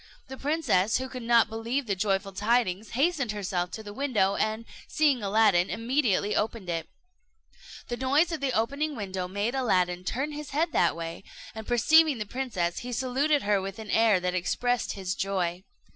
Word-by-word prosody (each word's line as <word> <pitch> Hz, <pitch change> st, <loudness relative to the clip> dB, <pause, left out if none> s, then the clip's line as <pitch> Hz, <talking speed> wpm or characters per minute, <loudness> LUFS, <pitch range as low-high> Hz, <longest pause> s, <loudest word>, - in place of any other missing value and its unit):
The 265 Hz, -, -7 dB
princess, 275 Hz, -, +1 dB
who 260 Hz, +1 st, -4 dB
could 255 Hz, -1 st, -7 dB
not 235 Hz, -1 st, +4 dB
believe 230 Hz, +5 st, -3 dB
the 200 Hz, -3 st, -1 dB
joyful 195 Hz, 0 st, -1 dB
tidings, 210 Hz, 0 st, 0 dB
hastened 275 Hz, -6 st, +1 dB
herself 185 Hz, -3 st, -2 dB
to 220 Hz, -, -6 dB
the 205 Hz, -1 st, -8 dB
window, 220 Hz, -7 st, +1 dB
and 220 Hz, +1 st, -1 dB, 0.2 s
seeing 290 Hz, -6 st, +2 dB
Aladdin, 200 Hz, -3 st, +3 dB
immediately 230 Hz, -3 st, 0 dB
opened 215 Hz, -3 st, -2 dB
it. 165 Hz, -2 st, -3 dB, 1.0 s
The 240 Hz, -, -4 dB
noise 285 Hz, +7 st, +2 dB
of 315 Hz, -4 st, -4 dB
opening 280 Hz, +4 st, 0 dB
the -, -, -9 dB
window 190 Hz, -3 st, -4 dB
made 205 Hz, +6 st, -2 dB
Aladdin 180 Hz, -9 st, +1 dB
turn 270 Hz, +10 st, -2 dB
his 300 Hz, 0 st, -7 dB
head 320 Hz, +4 st, 0 dB
that 170 Hz, -, +2 dB
way, 165 Hz, +2 st, -6 dB, 0.3 s
and 220 Hz, 0 st, -8 dB
perceiving 300 Hz, +4 st, +4 dB
the 215 Hz, -, -4 dB
princess, 205 Hz, -8 st, -2 dB
he 245 Hz, -, -6 dB
saluted 265 Hz, +5 st, +1 dB
her 205 Hz, -1 st, +2 dB
with 195 Hz, 0 st, -6 dB
an 220 Hz, -3 st, -7 dB
air 220 Hz, -4 st, +4 dB
that 180 Hz, 0 st, -2 dB
expressed 245 Hz, +7 st, -1 dB
his 190 Hz, -2 st, -3 dB
joy. 185 Hz, -3 st, -2 dB
220 Hz, 175 wpm, -27 LUFS, 195-265 Hz, 1.0 s, not